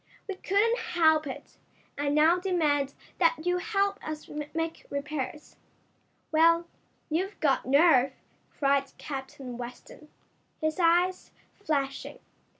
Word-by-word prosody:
"We 395 - -2
couldn't 415 +5 +1
help 320 -9 +3
it. 265 - -9 0.4
I 285 0 -1
now 310 +4 +4
demand 300 -7 +1 0.2
that 330 -2 +2
you 360 0 +1
help 400 0 0
us 310 -1 -6 0.2
make 325 0 -4
repairs." 295 +1 -5 0.7
"Well, 335 +2 +4 0.5
you've 375 +6 -1
got 280 -5 +1
nerve!" 275 -2 +5 0.5
cried 275 -1 +1
Captain 265 -3 -7
Weston, 245 +5 -10 0.5
his 315 +2 -1
eyes 350 +2 +2 0.2
flashing. 280 -8 -3
315 Hz, 110 wpm, -28 LUFS, 280-355 Hz, 0.7 s, nerve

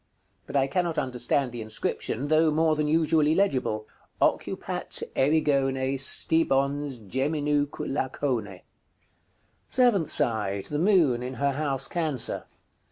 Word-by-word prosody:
But - - -8
I 135 - +3
cannot 170 +4 -1
understand 125 +1 0
the 120 -1 -6
inscription, 110 +4 -3
though 155 +1 +4
more 155 +1 +2
than 150 0 -1
usually 155 0 +2
legible. 130 - 0 0.3
"OCCUPAT - - -1
ERIGONE 135 -2 +1
STIBONS 140 -1 +1
GEMINUQ' 145 +3 -1
LACONE." 130 -4 -2
§ - - -11
CXIV. 95 -3 -12 1.1
Seventh 240 -10 +3
side. 105 -8 -1
The 150 - -3
Moon, 165 - +3
in 125 +1 -5
her 140 +1 0
house 135 -2 -1
Cancer. 155 -8 -1
140 Hz, 120 wpm, -26 LUFS, 130-155 Hz, 1.1 s, though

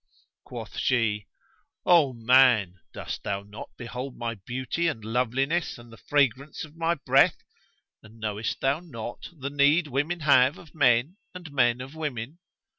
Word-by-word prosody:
Quoth - - -8
she, 110 -5 +1 0.6
"O 165 -6 +5
man, 115 -6 +4
cost - - -6
thou 100 0 -3
not 105 +2 -10
behold 125 +2 -6
my 115 -1 -3
beauty 130 - -3
and 115 -10 -3
loveliness 130 +8 0
and 120 -1 -14
the - - -13
fragrance 140 +1 +1
of 155 0 -18
my 165 +1 0
breath; 140 - +3 0.6
and 110 +1 -17
knowest 110 0 -3
thou 135 +3 +1
not 120 -9 -8
the 140 -4 -6
need 145 +4 +4
women 150 +5 -2
have 140 -1 +4
of 160 - -15
men 130 - +3 0.2
and 175 -4 -9
men 125 -3 +2
of 135 +3 -9
women? 150 -1 -5
130 Hz, 150 wpm, -26 LUFS, 115-150 Hz, 0.6 s, O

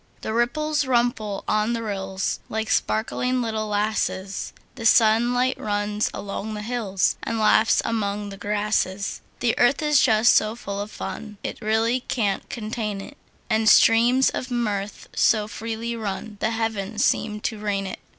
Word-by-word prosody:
The 220 - -3
ripples 295 +6 +1
wimple 235 -5 0
on 215 +2 +1
the 230 -1 -3
rills, 195 -2 -3
Like 220 0 -2
sparkling 250 +3 0
little 220 -2 -2
lasses; 205 -2 -2 0.2
The 240 - -9
sunlight 240 +3 +4
runs 205 0 -1
along 205 +2 -5
the 210 - -5
hills, 215 -5 0
And 230 - -3
laughs 215 +1 +4
among 205 -2 -2
the 195 - -9
grasses. 205 -1 -1 0.2
The 235 -2 +2
earth 270 +5 +3
is 300 -2 +4
just 220 -1 +5
so 215 +1 +2
full 200 -4 -5
of 205 - -5
fun 215 -1 -7
It - - -5
really 225 +3 +1
can't 210 -6 -2
contain 215 -2 -4
it; 275 +9 -9 0.3
And 220 -1 +3
streams 240 +4 +5
of 255 - -4
mirth 210 -4 -3
so 215 -2 +3
freely 225 +2 -4
run 210 -1 -5
The 220 - +1
heavens 225 -2 -1
seem 210 -1 0
to 220 -1 -3
rain 200 -2 -1
it. 190 - -6
220 Hz, 155 wpm, -24 LUFS, 205-235 Hz, 0.3 s, just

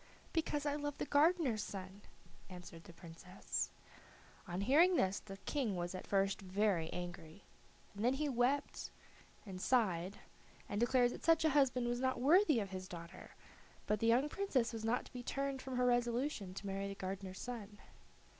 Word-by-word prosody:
"Because 300 -3 0
I 290 - +1
love 290 -1 -3
the - - -2
gardener's 290 -6 +3
son," 195 -1 -7 0.5
answered 175 -2 -10
the - - -11
Princess. 170 +2 -5 0.8
On 180 +1 -3
hearing 320 - +5
this 190 - +2
the 195 -2 -10
King 235 -2 -1
was 175 0 -3
at 185 - -7
first 195 0 +1
very 190 -3 0
angry, 175 0 -7 0.5
and 205 +1 -5
then 250 +3 +3
he 300 +2 -1
wept 265 +2 0 0.6
and 185 -3 -7
sighed, 195 -6 +1 0.5
and 205 - -2
declared 245 +1 +4
that - - -8
such 325 0 +4
a 315 - +4
husband 265 -3 +3
was 240 0 -1
not 260 -1 0
worthy 305 - +5
of 200 -3 -4
his 185 0 -5
daughter; 170 +1 -10 0.5
but 210 0 +1
the 225 - +1
young 245 +5 +4
Princess 285 - 0
was 225 -1 -5
not 230 +3 0
to - - -15
be 250 - -5
turned 275 +1 -2
from 260 -1 -5
her 250 - +3
resolution 240 -4 0
to 200 - -6
marry 195 0 -2
the 200 - -5
gardener's 190 0 -5
son. 220 -4 -6
225 Hz, 175 wpm, -37 LUFS, 190-265 Hz, 0.8 s, hearing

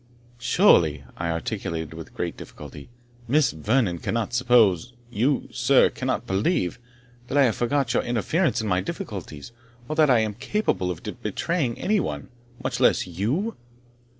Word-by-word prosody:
"Surely," 85 - +4
I 85 -1 -3
articulated 80 -1 -3
with - - -10
great - - -3
difficulty 70 - -11 0.4
"Miss 140 +1 +3
Vernon 100 - 0
cannot 115 +4 -2
suppose 120 -4 +3 0.2
you, 125 +5 +1
sir, - - +4
cannot - - -2
believe, 95 - 0 0.5
that 135 - -1
I 140 - +6
have 120 -5 +2
forgot 125 0 0
your - - +2
interference 135 - 0
in 110 - -3
my 90 -2 +1
difficulties, 75 -2 -7 0.4
or 155 - -3
that 155 -2 +4
I 120 -3 +5
am 110 -1 -1
capable 130 - -1
of 90 -3 -5 0.2
betraying 150 -9 -1
any 210 +1 +1
one, 75 - -4 0.3
much - - -2
less - - +3
you?" 120 - -2
115 Hz, 150 wpm, -24 LUFS, 90-140 Hz, 0.5 s, I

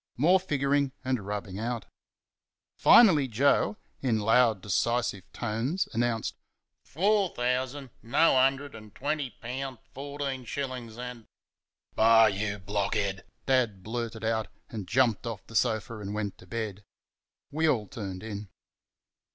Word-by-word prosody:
More 175 +9 +5
figuring 140 -5 0
and 125 -6 -1
rubbing 100 -2 -4
out. 115 -2 -3 0.9
Finally 165 - +7
Joe, 115 -3 +2 0.2
in 120 -5 +1
loud, 110 0 +4
decisive 105 0 -1
tones, 120 - -1
announced, 115 -1 0 0.5
"FOUR 200 +3 +2
thousand, 130 +2 -1
NO 135 +7 +3
'undered 135 +2 +2
an' 110 -1 -11
twenty 145 +4 -2
poun', 130 +2 -6 0.2
fourteen 140 -1 -4
shillin's 125 -3 -5
an' 125 -2 -7 0.3
" - - -45
"Bah! 115 0 +7
YOU 105 0 0
blockhead!" 100 0 -1 0.2
Dad 120 -8 +1
blurted 115 0 -4
out, 110 -1 0 0.2
and 105 -5 -5
jumped 120 0 +2
off 110 -4 -6
the - - -14
sofa 110 -1 0
and 100 0 -5
went 105 -2 -3
to 95 - -15
bed. 105 -1 -4 0.7
We 160 +2 +2
all 110 -7 +1
turned 100 -7 -6
in. 105 -2 -6
115 Hz, 130 wpm, -28 LUFS, 105-135 Hz, 0.9 s, Finally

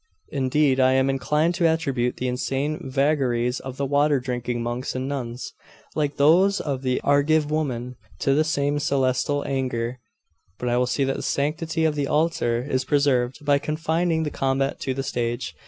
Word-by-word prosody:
Indeed, 135 0 +2
I 130 0 +5
am 130 +1 +3
inclined 150 +5 +1
to 170 -1 +2
attribute 135 -7 0
the 130 - -2
insane 135 +4 -2
vagaries 130 -3 +1
of 130 0 -8
the 140 - -1
water 145 +1 +2
drinking 120 -2 -3
monks 120 +2 -3
and 130 +1 -2
nuns, 125 -3 -5 0.4
like 145 -2 -1
those 180 +8 +4
of 135 -3 -3
the 130 -1 0
Argive 145 +1 +2
women, 125 -5 -2 0.2
to 135 - +3
the 155 +3 +3
same 145 -2 0
celestial 135 0 0
anger. 125 -2 -2 0.6
But 125 - -2
I 120 - +1
will 125 0 +2
see 140 - 0
that 135 0 -1
the - - -5
sanctity 160 +3 -1
of 155 - +2
the 145 -2 -1
altar 150 -7 +1
is 130 -2 0
preserved, 135 -1 +1
by 145 -1 +4
confining 160 +2 0
the 150 - -3
combat 135 0 -1
to 130 - -2
the 135 - -2
stage. 120 -6 -2
135 Hz, 175 wpm, -24 LUFS, 125-150 Hz, 0.6 s, I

